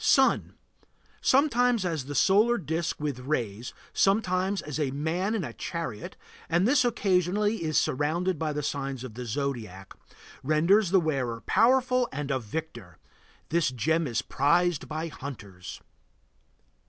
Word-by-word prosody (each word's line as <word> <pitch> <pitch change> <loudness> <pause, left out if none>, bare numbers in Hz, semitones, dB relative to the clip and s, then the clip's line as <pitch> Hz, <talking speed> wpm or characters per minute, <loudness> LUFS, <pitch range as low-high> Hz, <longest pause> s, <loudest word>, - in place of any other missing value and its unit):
SUN. - - +3 0.7
Sometimes 245 -6 +3
as 160 -6 -2
the 145 +1 -6
solar 210 - +4
disk 165 -1 -3
with 145 -4 -3
rays, 120 -5 -3 0.2
sometimes 195 -1 +1
as 150 0 -5
a 145 -3 0
man 165 +10 -1
in 205 - -1
a - - -6
chariot, 165 -11 -5 0.3
and 175 +4 +3
this 260 0 +4
occasionally 205 -2 +1
is 155 -1 0
surrounded 160 +5 0
by 155 -1 -1
the 150 0 -3
signs 135 -3 -3
of 125 -4 -8
the 125 +2 -6
zodiac. 110 -7 -4 0.5
Renders 170 +8 +3
the 190 +1 +5
wearer 130 -8 -2
powerful 250 +3 +3
and 140 0 -4
a 130 - +1
victor; 120 - -7 0.5
this 170 -2 +2
gem 160 +6 0
is 115 -3 -1
prized 170 +3 +1
by 160 +1 -3
hunters. 100 - -9
160 Hz, 140 wpm, -27 LUFS, 135-190 Hz, 0.7 s, the